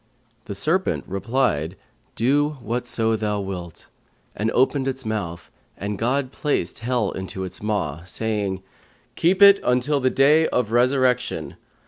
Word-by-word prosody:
The 100 - -6
serpent 170 - 0
replied, 95 - -1 0.4
'Do 145 +5 +1
whatso 115 -1 0
Thou 105 -1 -1
wilt;' 90 -4 -7 0.5
and 110 +3 -1
opened 135 +3 +2
his 135 -1 -3
mouth 95 -6 -4 0.3
and 100 0 -4
God 130 +3 0
placed 140 - -2
Hell 120 -2 0
into 95 0 -6
his 95 -1 -6
maw, 95 -8 -2
saying, 100 0 -2 0.5
'Keep 185 +4 +3
it 200 0 +9
until 125 +4 +2
the 130 -1 +2
Day 150 +5 +4
of 120 -3 -1
Resurrection. 125 +1 +1
115 Hz, 130 wpm, -23 LUFS, 100-135 Hz, 0.5 s, it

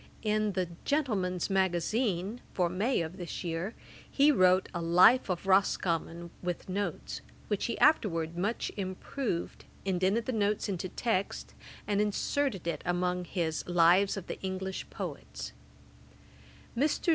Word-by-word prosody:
] - - -25
In 215 -1 +1
the 185 -2 0 0.2
Gentleman's 205 - 0
Magazine 190 +3 0
for 180 -2 +2
May 200 +6 +1
of 165 +3 -5
this 175 0 -5
year 170 +5 -3 0.3
he 290 +2 +5
wrote 185 -6 +4
a 175 - -2
'Life 180 +9 +6
of 180 +1 -2
Roscommon,'[*] 170 -3 +1
with 175 -1 -3
Notes, 200 +2 -3 0.3
which 205 -2 0
he 235 - -2
afterwards 170 - +3
much 200 +7 -1
improved, 190 +1 -3 0.2
indented 190 +4 +1
the - - -1
notes 210 -2 0
into 185 -2 -3
text, 200 -1 -2 0.3
and 205 0 +1
inserted 210 - 0
it 170 - -2
amongst 180 0 -1
his 165 -4 -1
Lives 175 +3 +4
of 190 - -5
the - - -6
English 190 0 -4
Poets. - - -6 1.2
Mr. 290 +6 +1
190 Hz, 135 wpm, -30 LUFS, 175-210 Hz, 1.2 s, Life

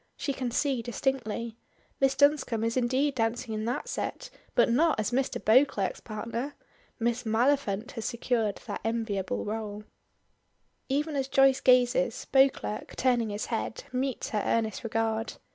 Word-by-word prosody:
She 280 - -2
can 255 -2 -3
see 260 0 0
distinctly. 235 -2 -2 0.4
Miss 270 0 +3
Dunscombe 285 -6 +3
is 230 0 0
indeed 260 +3 +1
dancing 230 -1 -1
in 215 0 -3
that 240 +2 -2
set - - -4 0.2
but - - +5
not 300 +4 +3
as 215 - 0
Mr. 260 +2 0
Beauclerk's 220 -4 +3
partner. 230 +5 -5 0.4
Miss 235 +1 0
Maliphant 230 -2 +1
has 225 -5 -6
secured 235 -4 -1
that - - -5
enviable 220 -4 -2
rôle. 210 -1 -4 1.1
Even 295 +3 0
as 270 -1 0
Joyce 270 -1 +4
gazes, 250 -4 +3
Beauclerk, 270 -5 +2
turning 245 -3 +2
his 205 +1 -3
head, 225 +1 -3
meets 260 0 -2
her 210 - 0
earnest 220 -2 0
regard. 225 0 -1
235 Hz, 145 wpm, -28 LUFS, 220-265 Hz, 1.1 s, but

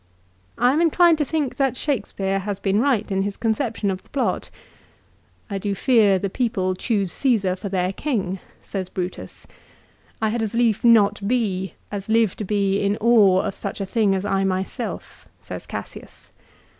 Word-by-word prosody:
I 245 +2 +4
am 310 - +2
inclined 340 0 +4
to 295 - +2
think 295 -3 -2
that 270 -3 +1
Shakespeare 200 -8 -1
has 200 0 -3
been 195 +1 +1
right 235 -5 +1
in 195 0 +1
his 200 0 -3
conception 225 -3 -1
of 185 0 -5
the - - -27
plot. 280 - -1 0.5
" - - -37
I 200 -2 -3
do 200 0 -2
fear 210 -3 +4
the 200 - -2
people 195 -4 -1
Choose 195 -1 -1
Csesar 215 -9 +1
for 200 +2 -6
their 185 0 0
king," 195 -9 -2 0.2
says 190 -2 -5
Brutus. 180 0 -6 0.4
" - - -33 0.3
I 220 - +1
had 230 +1 -1
as 220 0 -2
lief 230 -1 +2
not 210 -4 +4
be, 195 -7 -1 0.2
as 200 0 -5
live 225 -3 +3
to - - -4
be 200 -1 +1
In 200 +1 0
awe 210 -5 +5
of - - -3
such - - -5
a 195 - -2
thing 200 -1 +2
as 190 +1 -2
I 195 -1 +1
my 190 -1 +1
self," - - -7
says - - -8
Cassius. - - -9
205 Hz, 185 wpm, -22 LUFS, 195-235 Hz, 0.5 s, awe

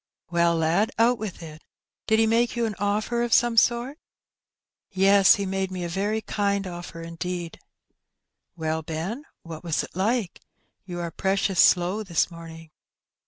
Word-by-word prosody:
'' - - -67
" - - -47
Well, 170 -1 +2
lad^ 165 +7 +2
out 235 +2 +3
with 200 -5 -6
it: 155 -1 -11 0.4
did 220 - +3
he 225 - +4
make 230 +2 +1
you 235 -1 0
an 220 - -2
offer 210 +4 0
of 240 -1 -1
some 240 -1 +3
sort?" 240 +6 +2 0.9
"Yes, 195 0 +5
he 200 - -3
made 190 0 -2
me 185 -1 -5
a 170 - -3
very 205 +5 -1
kind 200 -2 -1
offer 175 -2 -8
indeed." 170 0 -5 1.0
"Well, 160 0 -2
Ben, 170 - -5 0.2
what 165 -1 -9
was 165 -3 -1
it - - -11
like? 205 0 -1 0.4
You 175 -2 -6
are 170 -1 -4
precious 195 0 0
slow 180 +4 +3
this 175 -4 0
morning." 165 -1 -11
190 Hz, 165 wpm, -25 LUFS, 170-220 Hz, 1.0 s, Yes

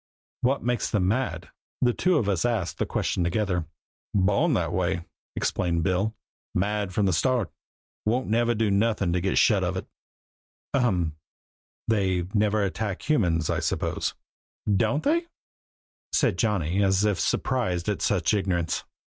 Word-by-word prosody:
"What 135 +3 +1
makes 120 0 0
them 95 -5 +1
mad?" 125 +6 -1 0.3
The 120 -1 +3
two 180 +4 +2
of 115 -8 0
us 95 -5 +1
asked 110 -7 -1
the - - 0
question 90 - -1
together. 90 -2 0 0.5
"Born 100 - +3
that - - -1
way!" 90 -1 0 0.3
explained 85 -2 0
Bill 95 +5 0 0.4
"mad 100 +1 0
from 100 +2 +1
the 95 - +2
start, 120 +4 +1 0.6
and - - +4
won't 125 +2 0
never 120 +2 +2
do 110 -1 +1
nothin' 100 -3 +1
to 90 - +1
get 95 +1 0
shut 100 -4 +4
of 95 +1 -1
it." - - -4 0.9
"Ahem 90 - +1 0.7
they 95 -5 +1
never 105 0 +2
attack 100 0 -3
humans, 85 - +2
I - - 0
suppose?" - - -1 0.6
"Don't 115 +9 +1
they?" 335 +4 +1 0.8
said - - +2
Johnny, 100 -5 +1
as 95 +1 +3
if 105 -3 +1
surprised 95 -10 0
at 100 -6 -1
such 85 -2 +1
ignorance. 90 -5 0
100 Hz, 150 wpm, -26 LUFS, 90-115 Hz, 0.9 s, and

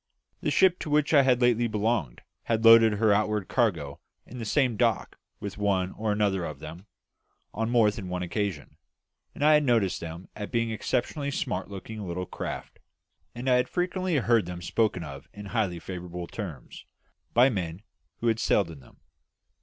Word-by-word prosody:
The - - 0
ship 185 -1 +4
to - - -5
which 150 +1 +2
I 145 - +8
had 130 -2 +3
lately 120 -1 +3
belonged 105 - -1 0.2
had 115 0 0
loaded 115 -1 +8
her 105 0 +3
outward 105 -1 0
cargo 85 - 0 0.3
in 125 - -10
the 115 - -4
same 125 +1 +2
dock 115 -3 0 0.2
with 100 0 -6
one 95 -2 +1
or 110 0 -2
another 100 -3 +1
of 75 -4 -5
them 80 +7 -10 0.7
on 115 +1 -1
more 115 -3 +4
than 100 -4 -7
one 90 0 -2
occasion, 95 -3 -3 0.6
and 145 - 0
I 155 - +7
had 150 0 +5
noticed 115 -8 +2
them 85 +2 -7
as 105 -1 -6
being 115 -1 0
exceptionally 125 +6 -2
smart 140 - -3
looking 105 +2 -7
little 90 -1 -4
craft; - - -6 0.6
and 120 +2 -5
I 125 -1 +5
had 125 0 0
frequently 180 0 -1
heard 115 -6 +2
them 90 -1 -6
spoken 100 -2 0
of 70 -3 -9
in 105 0 -9
highly 100 -5 -1
favourable 90 0 -6
terms, 85 - -8 0.5
by 125 +3 +6
men 90 -4 -4 0.4
who 120 - 0
had 115 -1 +2
sailed 100 -5 +2
in 75 - -11
them. 65 - -20
105 Hz, 180 wpm, -27 LUFS, 90-120 Hz, 0.7 s, I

